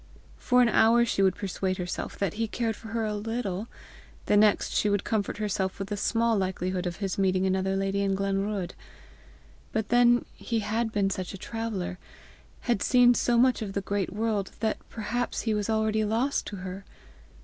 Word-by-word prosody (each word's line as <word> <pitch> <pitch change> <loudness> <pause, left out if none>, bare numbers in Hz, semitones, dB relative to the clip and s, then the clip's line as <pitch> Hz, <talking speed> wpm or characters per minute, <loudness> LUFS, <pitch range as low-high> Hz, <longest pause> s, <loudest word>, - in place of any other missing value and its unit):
For 250 -1 +4
an 235 - +3
hour 230 +2 +5
she 230 - 0
would 190 -2 +3
persuade 190 -1 -2
herself 180 -1 -4
that 195 -4 -1
he 225 +1 -1
cared 225 0 -2
for 220 - -11
her 225 0 -2
a 210 - -2
little; 210 -1 -3 0.6
the - - +3
next 210 0 +4
she 210 - +2
would 205 -1 +1
comfort 210 -2 -1
herself 195 -3 -1
with 195 0 -5
the 205 - -1
small 230 +3 +1
likelihood 185 -1 -1
of 175 - -3
his 195 -1 -3
meeting 190 -1 +2
another 190 0 +1
lady 195 +1 0
in 195 -1 +1
Glenruadh. 195 -1 -1 1.0
But 220 -1 -2
then 240 0 +4
he 230 -2 -2
had 220 +2 -1
been 200 -2 +1
such 185 0 -4
a - - -7
traveller, 205 -4 -4 0.6
had 235 -5 0
seen 245 -1 +5
so 240 0 +2
much 250 0 +4
of 200 -3 -4
the 200 - -1
great 195 -1 -2
world, 210 -2 -1
that 220 0 0
perhaps 235 +2 -2
he 225 - 0
was 210 0 -1
already 220 0 +1
lost 230 +6 0
to 205 - -5
her! 190 +1 -7
210 Hz, 190 wpm, -27 LUFS, 195-225 Hz, 1.0 s, hour